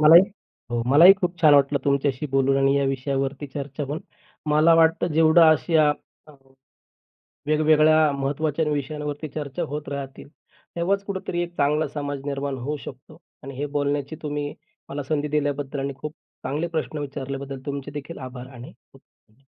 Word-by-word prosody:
मलाही 160 +4 +9 0.5
हो. 120 -1 -1
मलाही 165 +8 +8
खूप 180 -3 -3
छान 150 -3 +7
वाटलं 140 0 +4
तुमच्याशी 140 0 0
बोलून 135 0 +2
आणि 135 +1 +3
या 140 - +2
विषयावरती 135 +1 -2
चर्चा 140 +1 -6
होऊन. 145 +4 -4 0.5
मला 155 +2 +5
वाटतं 165 +1 +3
जेवढं 160 +2 +5
अशा 160 +1 +2
हां, 150 0 -5
हां. 135 0 -28 0.9
वेगवेगळ्या 155 0 +4
महत्त्वाच्या 145 +3 -1
विषयांवरती 150 +1 -4
चर्चा 150 +3 -5
होत 150 0 -5
राहतील. 140 -1 -7 0.5
तेव्हाच 195 +4 0
कुठेतरी 190 -3 -3
एक 175 0 -5
चांगला 150 +2 +1
समाज 145 -1 -4
निर्माण 140 -1 -3
होऊ 145 +5 -3
शकतो 130 0 -11 0.2
आणि 135 0 -8
हे 145 +2 -2
बोलण्याची 145 +1 -1
तुम्ही 145 -1 -3 0.3
मला 145 +1 -4
संधी 150 +1 -2
दिल्याबद्दल 145 -1 -2
आणि 140 0 -3
खूप 150 +3 -6 0.3
चांगले 150 +5 -2
प्रश्न 155 -2 -3
विचारल्याबद्दल 140 -1 -5
तुमचेदेखील 145 +3 -6
आभार 130 -1 -8
आणि 120 +1 -10 0.2
खूप 110 +6 -26
145 Hz, 150 wpm, -24 LUFS, 135-155 Hz, 0.9 s, मलाही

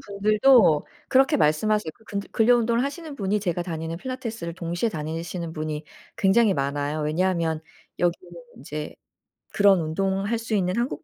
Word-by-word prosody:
분들도 210 - +4 0.2
그렇게 265 +1 +4
말씀하세요. 160 +5 +2
그 220 - -25
근들 200 -2 -5
근력 240 +2 +4
운동을 235 +1 +1
하시는 300 +2 -5
분이 205 -3 -1
제가 175 -3 -1
다니는 165 -1 -4
필라테스를 230 -8 -5
동시에 175 +5 -2
다니시는 165 0 -5
분이 155 -1 -4 0.3
굉장히 200 +1 +4
많아요. 145 +2 -2
왜냐하면 165 0 0 0.4
여기는 175 0 -1 0.2
인제 150 +2 -6 0.6
그런 200 -2 +5
운동할 195 +7 -1
수 225 0 -5
있는 185 -3 +1
한국 240 +6 -2
190 Hz, 370 characters per minute, -24 LUFS, 160-220 Hz, 0.6 s, 그런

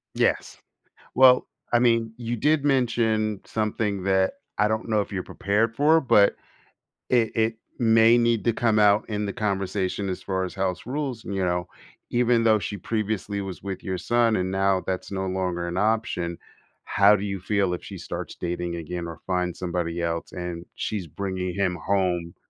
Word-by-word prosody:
Yes. - - 0 0.6
Well, 130 -1 +6 0.3
I 120 - +5
mean, 115 -2 +2
you 120 0 -3
did 150 +4 +2
mention 115 -6 +1
something 105 -2 -1
that 95 -1 +2 0.2
I 105 - +3
don't 110 +1 -2
know 110 -2 +2
if 100 - -4
you're 95 -2 -2
prepared 110 +3 0
for, 155 +5 +4
but 105 -8 +4 0.7
it 120 -3 +3
it 110 0 +1 0.2
may 115 0 +5
need 115 -4 +2
to 115 - +3
come 115 -1 +1
out 105 0 +4
in 105 0 -2
the 100 - -3
conversation 100 -1 -1
as 90 - -4
far 95 -1 -2
as 90 - -5
house 95 -1 -2
rules, 130 -3 -3
and 100 - -4
you 95 - 0
know? 90 -1 -1 0.4
Even 120 -1 +3
though 110 -2 +4
she 100 - -4
previously 105 0 -2
was 95 -2 -7
with 95 -1 -5
your 95 -1 -2
son 115 +3 +2
and 95 0 -1
now 95 -1 +1
that's 95 -1 -3
no 95 -1 -2
longer 90 -2 -2
an 85 - -4
option, 100 -5 0 0.5
how 100 +1 +5
do 100 - -3
you 100 -1 -3
feel 95 -1 0
if 90 - -5
she - - -8
starts - - -6
dating 85 0 -3
again 85 +1 -5
or 80 -3 -7
find 90 -2 -1
somebody 85 -1 -2
else 85 0 -2
and 90 -2 -5
she's 100 -6 -3
bringing 95 +1 -4
him 95 -3 0
home 90 -3 0
100 Hz, 180 wpm, -25 LUFS, 90-115 Hz, 0.7 s, Well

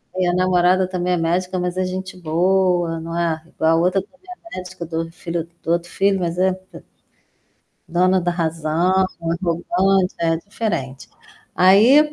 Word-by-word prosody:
e 185 -1 +1
a 175 - +1
namorada 185 0 +3
também 180 -1 -1
é 180 - +1
médica, 180 +3 -1
mas 180 0 -2
é 185 - +1
gente 185 0 -5
boa, 175 0 +1
não 165 +1 -5
é 165 -2 0
igual 160 -1 0
a - - +4
outra 185 +2 +2
também 265 +8 -21 0.3
é - - -6
médica, 180 -1 -7
do 160 0 -5
outr 165 0 -3
filho 170 -1 -4
do 165 - -2
outro 170 0 0
filho, 195 0 +1
mas 170 -1 -2
é 185 0 +3
p 185 0 -13 1.1
dona 185 +2 +2
da 175 - 0
razão, 170 +2 +1 0.2
é 165 - -8
arrogante, 180 +2 +1
é 165 -1 +1
diferente. 165 - -4 0.5
Aí, 240 +12 +6
180 Hz, 175 wpm, -20 LUFS, 170-185 Hz, 1.1 s, Aí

